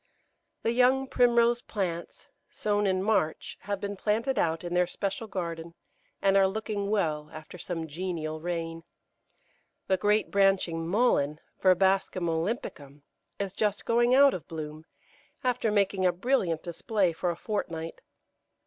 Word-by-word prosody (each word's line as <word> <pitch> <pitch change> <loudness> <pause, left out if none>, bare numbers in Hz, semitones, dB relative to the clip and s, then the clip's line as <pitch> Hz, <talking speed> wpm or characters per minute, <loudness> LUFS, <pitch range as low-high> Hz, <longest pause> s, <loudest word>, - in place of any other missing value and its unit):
The 230 - +2
young 255 +2 +3
Primrose 240 -2 +3
plants, 175 -7 -4 0.2
sown 205 -1 0
in 185 0 +1
March, 200 -7 0
have 200 -1 -3
been 200 0 -4
planted 225 +7 0
out 165 0 0
in 175 0 -4
their 180 0 +3
special 200 +4 -3
garden, 170 -3 -5 0.5
and 195 0 +4
are 195 -1 +6
looking 205 0 -3
well 155 -8 0
after 155 +3 -10
some 165 -1 -4
genial 160 -1 -4
rain. 165 -1 -4 1.0
The 190 - +2
great 210 +3 +1
branching 190 -5 +2
Mullein, 165 - +2 0.2
Verbascum 190 -1 +3
olympicum, 160 - -3 0.3
is 200 -2 -3
just 205 0 -1
going 240 +2 +3
out 280 0 +7
of 170 - -6
bloom, 155 -1 -7 0.6
after 250 -3 +1
making 200 -2 +1
a - - +4
brilliant 180 - 0
display 180 +1 0
for 175 +2 -1
a 170 - -1
fortnight. 165 -6 -4
190 Hz, 140 wpm, -28 LUFS, 165-215 Hz, 1.0 s, out